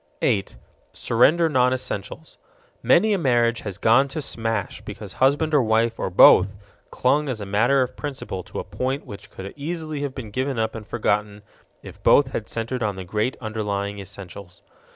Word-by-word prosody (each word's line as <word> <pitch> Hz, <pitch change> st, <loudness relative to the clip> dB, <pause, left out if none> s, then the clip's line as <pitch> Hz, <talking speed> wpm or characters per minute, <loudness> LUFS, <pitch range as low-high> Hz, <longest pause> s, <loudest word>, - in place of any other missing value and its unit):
8. 95 Hz, -10 st, 0 dB, 0.4 s
Surrender 155 Hz, +9 st, +3 dB
nonessentials. 125 Hz, -, -2 dB, 0.4 s
Many 215 Hz, +4 st, +4 dB
a 200 Hz, -, +1 dB
marriage 120 Hz, -5 st, +2 dB
has 100 Hz, -3 st, -6 dB
gone 115 Hz, +6 st, +4 dB
to 140 Hz, +3 st, -5 dB
smash 115 Hz, -7 st, -3 dB
because -, -, -8 dB
husband 145 Hz, +4 st, +3 dB
or 145 Hz, -, +5 dB
wife 115 Hz, 0 st, +1 dB
or -, -, -1 dB
both 95 Hz, +2 st, +6 dB, 0.3 s
clung 140 Hz, +3 st, +1 dB
as 120 Hz, -4 st, -3 dB
a 100 Hz, -, -5 dB
matter 115 Hz, +7 st, +3 dB
of 125 Hz, -, -6 dB
principle 135 Hz, -10 st, -5 dB
to -, -, -9 dB
a -, -, -2 dB
point 130 Hz, +2 st, -3 dB
which 100 Hz, -6 st, -10 dB
could 95 Hz, +1 st, -9 dB
easily 155 Hz, 0 st, -4 dB
have 140 Hz, -2 st, -4 dB
been 115 Hz, -6 st, -7 dB
given 130 Hz, +3 st, -2 dB
up 110 Hz, 0 st, -1 dB
and 110 Hz, -2 st, -8 dB
forgotten 105 Hz, -2 st, -1 dB, 0.4 s
if -, -, -12 dB
both 140 Hz, -2 st, +5 dB
had 110 Hz, -, -4 dB
centered 115 Hz, +2 st, -3 dB
on 105 Hz, -3 st, -1 dB
the 95 Hz, -, -6 dB
great 105 Hz, +7 st, -1 dB
underlying 100 Hz, -2 st, -3 dB
essentials. 95 Hz, -2 st, -10 dB
115 Hz, 175 wpm, -23 LUFS, 105-135 Hz, 0.4 s, both